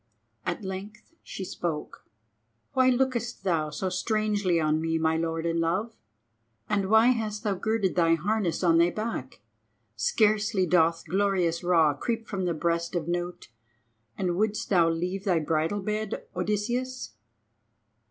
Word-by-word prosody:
At 180 Hz, +3 st, -2 dB
length 200 Hz, +5 st, -7 dB
she 190 Hz, -, -7 dB
spoke. 165 Hz, -4 st, -5 dB, 0.7 s
"Why 260 Hz, -1 st, +4 dB
lookest 245 Hz, -2 st, 0 dB
thou 165 Hz, -5 st, +1 dB
so 185 Hz, +4 st, -3 dB
strangely 205 Hz, -2 st, 0 dB
on 155 Hz, 0 st, +1 dB
me, 165 Hz, 0 st, 0 dB
my 160 Hz, 0 st, +1 dB
Lord 165 Hz, 0 st, -2 dB
and 165 Hz, 0 st, 0 dB
Love; 190 Hz, +8 st, -1 dB, 0.7 s
and 195 Hz, -2 st, 0 dB
why 220 Hz, +3 st, +6 dB
hast 220 Hz, -3 st, -1 dB
thou 210 Hz, -3 st, +1 dB
girded 210 Hz, 0 st, 0 dB
thy 165 Hz, -2 st, +4 dB
harness 190 Hz, +1 st, -1 dB
on 165 Hz, -2 st, +5 dB
thy 170 Hz, +1 st, +5 dB
back? 215 Hz, -, -5 dB, 0.5 s
Scarcely 210 Hz, -, +2 dB
doth 165 Hz, -1 st, +2 dB
glorious 185 Hz, -1 st, +1 dB
Ra 165 Hz, -4 st, +4 dB
creep 225 Hz, -, -3 dB
from 190 Hz, -3 st, -2 dB
the 170 Hz, -2 st, 0 dB
breast 170 Hz, +2 st, -1 dB
of 170 Hz, -2 st, -2 dB
Nout, 175 Hz, -2 st, -3 dB, 0.7 s
and 180 Hz, -2 st, 0 dB
wouldest 215 Hz, +2 st, -1 dB
thou 170 Hz, -4 st, +5 dB
leave 180 Hz, +4 st, -2 dB
thy 185 Hz, -4 st, +2 dB
bridal 160 Hz, +5 st, 0 dB
bed, 215 Hz, 0 st, -3 dB
Odysseus?" 240 Hz, +7 st, -2 dB
185 Hz, 145 wpm, -27 LUFS, 165-215 Hz, 0.7 s, why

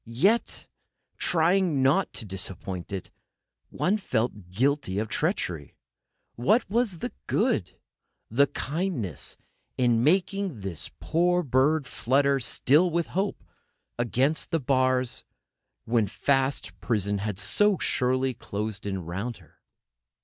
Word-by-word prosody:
Yet, 190 Hz, -, +1 dB, 0.5 s
trying 170 Hz, -3 st, +2 dB
not 150 Hz, +9 st, +3 dB
to 115 Hz, -, -6 dB
disappoint 95 Hz, -1 st, -6 dB
it, 95 Hz, -2 st, -5 dB, 0.6 s
one 200 Hz, +4 st, +1 dB
felt 110 Hz, -, -2 dB
guilty 125 Hz, 0 st, +1 dB
of 110 Hz, +1 st, -1 dB
treachery: 90 Hz, -, -1 dB, 0.6 s
What 205 Hz, -, +2 dB
was 215 Hz, -2 st, +1 dB
the -, -, -3 dB, 0.2 s
good, -, -, 0 dB, 0.5 s
the 140 Hz, +6 st, +3 dB
kindness, 140 Hz, -, -3 dB, 0.4 s
in 120 Hz, -2 st, +3 dB
making 190 Hz, -, +1 dB
this 95 Hz, -5 st, -4 dB
poor 175 Hz, +2 st, +2 dB
bird 140 Hz, +3 st, +2 dB
flutter 140 Hz, +3 st, +2 dB
still 145 Hz, +7 st, +3 dB
with 170 Hz, 0 st, -1 dB
hope 195 Hz, +2 st, -1 dB, 0.6 s
against 125 Hz, -, +1 dB
the 165 Hz, -, +1 dB
bars, 130 Hz, -2 st, +1 dB, 0.6 s
when 115 Hz, -2 st, +2 dB
fast 135 Hz, +6 st, 0 dB
prison 100 Hz, -3 st, 0 dB
had 105 Hz, -1 st, -3 dB
so 200 Hz, -, +2 dB
surely 130 Hz, -1 st, +1 dB
closed 105 Hz, -2 st, -4 dB
in 95 Hz, -3 st, -3 dB
round 100 Hz, +8 st, -4 dB
her? 85 Hz, -6 st, -22 dB
130 Hz, 115 wpm, -27 LUFS, 105-165 Hz, 0.6 s, not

